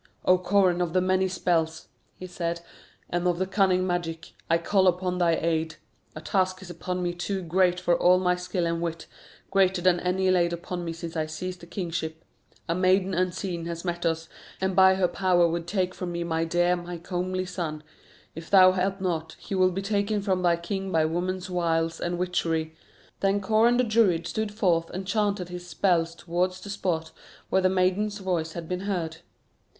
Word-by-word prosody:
"O 185 - +6
Coran 185 -1 +2
of 170 -2 -1
the 185 - +4
many 185 +1 +2
spells," 165 -3 -1 0.3
he 185 - -8
said, 170 -1 -3 0.5
"and 175 +1 0
of 175 -1 +1
the 185 - 0
cunning 185 -1 +2
magic, 170 -2 -3 0.2
I 165 - +4
call 190 +3 +2
upon 180 0 +1
thy 170 -2 +3
aid. 160 -1 -1 0.4
A 155 - -7
task 185 +1 0
is 175 - -8
upon 180 +2 -4
me 175 0 -1
too 190 +2 -3
great 180 +1 +2
for 175 -1 +2
all 180 +1 +5
my 180 -1 +2
skill 180 0 -2
and 170 0 -1
wit, 165 -1 -3 0.5
greater 190 -1 +3
than 175 0 +3
any 185 +1 +1
laid 175 -2 +2
upon 175 +1 -5
me 165 - -3
since 165 0 -7
I 155 -1 -1
seized 180 +3 -5
the 170 - -13
kingship. 165 -3 -4 0.4
A 165 - +1
maiden 185 +1 +2
unseen 180 -1 -2
has 170 +1 -5
met 175 -1 -3
us, 165 0 -1 0.3
and 190 0 -1
by 190 0 +6
her 190 -1 +2
power 180 -2 +3
would 170 0 -3
take 185 -1 0
from 180 -1 -5
me 170 0 -2
my 165 -1 -1
dear, 175 +2 +2
my 175 0 -6
comely 185 +2 -3
son. 165 -4 -4 0.5
If 165 +1 -9
thou 185 -2 +8
help 190 +1 -1
not, 160 -4 -2
he - - -8
will 185 -1 +4
be 190 +2 -4
taken 205 0 0
from 190 -2 0
thy 175 -1 +3
king 190 +3 -4
by 160 -2 +3
woman's 180 +4 -2
wiles 165 -2 0
and 175 0 -1
witchery." 165 -3 -1 0.4
Then 195 +1 +2
Coran 220 +4 +3
the 250 - +3
Druid 215 -8 +2
stood 215 +4 -2
forth 175 -6 +1
and 190 +1 -5
chanted 200 -2 0
his 180 0 -7
spells 170 -2 +1
towards 180 +2 -1
the 200 +2 -8
spot 165 -5 -2 0.4
where 190 - +3
the 185 - +3
maiden's 190 +3 +1
voice 175 -5 -2
had 170 -2 -6
been 180 +1 -2
heard. 165 -4 -2
180 Hz, 195 wpm, -26 LUFS, 170-185 Hz, 0.5 s, thou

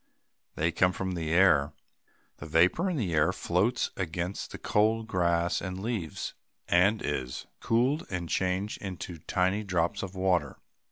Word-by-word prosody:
They 85 +2 +1
come 90 +3 +2
from 95 +1 -3
the 85 -3 -3
air. 80 -5 +4 0.6
The 75 - -8
vapor 90 - +3
in 175 - -1
the 95 -10 -1
air 75 -1 +3
floats 105 +8 0
against 90 +1 -3
the - - -7
cold 110 +2 +1
grass 85 -4 +1
and 95 0 -4
leaves, 100 -7 -3 0.3
and 100 +5 +3
is 65 -3 -3
cooled 130 +7 +1
and 90 -3 -3
changed 95 +4 -1
into 90 -3 -6
tiny 95 +6 0
drops 90 0 0
of 95 -1 -6
water. 95 -2 +1
90 Hz, 150 wpm, -29 LUFS, 85-105 Hz, 0.6 s, air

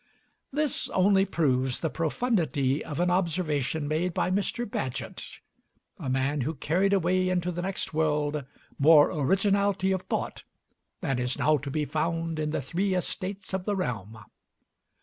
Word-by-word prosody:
This 295 0 -1
only 195 +1 +4
proves 130 -8 +1
the 160 - 0
profundity 155 - 0
of 150 -1 -5
an 175 0 +2
observation 160 -5 0
made 165 +4 -1
by 180 - +1
Mr. 205 +5 0
Bagehot 130 - -5 0.6
a 130 - -4
man 135 +2 0
who 155 +6 -2
carried 180 +8 +1
away 185 -1 +2
into 180 -1 0
the 175 0 -3
next 190 -2 -3
world 150 -1 0 0.4
more 150 +1 +7
originality 195 +4 +2
of 190 -1 0
thought - - -3 0.6
than 135 -8 0
is 125 +1 -1
now 155 0 +3
to 140 0 -6
be 150 +2 -1
found 165 +1 -1
in 155 0 -1
the 150 - -2
Three 185 +7 0
Estates 190 +2 -4
of 190 -1 -2
the 205 - 0
Realm. 115 - -3
165 Hz, 150 wpm, -28 LUFS, 145-190 Hz, 0.6 s, more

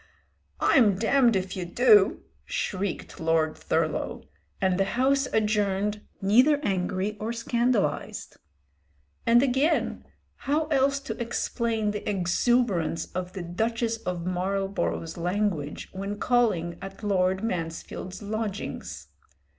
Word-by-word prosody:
"I'm 215 -7 +5
damned 235 +3 +3
if 185 -1 -2
you 185 - -3
do," 210 +2 +4 0.2
shrieked 200 - -3
Lord 160 -1 +1
Thurlow, - - -1 0.4
and 190 -1 +1
the - - +5
House 270 +1 +3
adjourned 210 -1 +1 0.2
neither 255 +9 +5
angry 190 +2 -1
or 220 +2 -2
scandalised. 235 -6 -1 0.9
And 235 +2 +6
again, 280 +5 +1 0.5
how 310 +2 +2
else 275 -1 +1
explain 230 -1 -1
the 210 0 -4
exuberance 190 -1 +1
of 185 0 -4
the 185 -2 -5
Duchess 225 +6 -1
of 180 -5 -4
Marlborough's 185 -2 -2
language 175 -4 -2
when 195 +2 -4
calling 205 -9 +1
at 195 +2 -9
Lord 190 -1 +1
Mansfield's 180 0 -4
lodgings? 200 - -4
205 Hz, 105 wpm, -27 LUFS, 185-235 Hz, 0.9 s, And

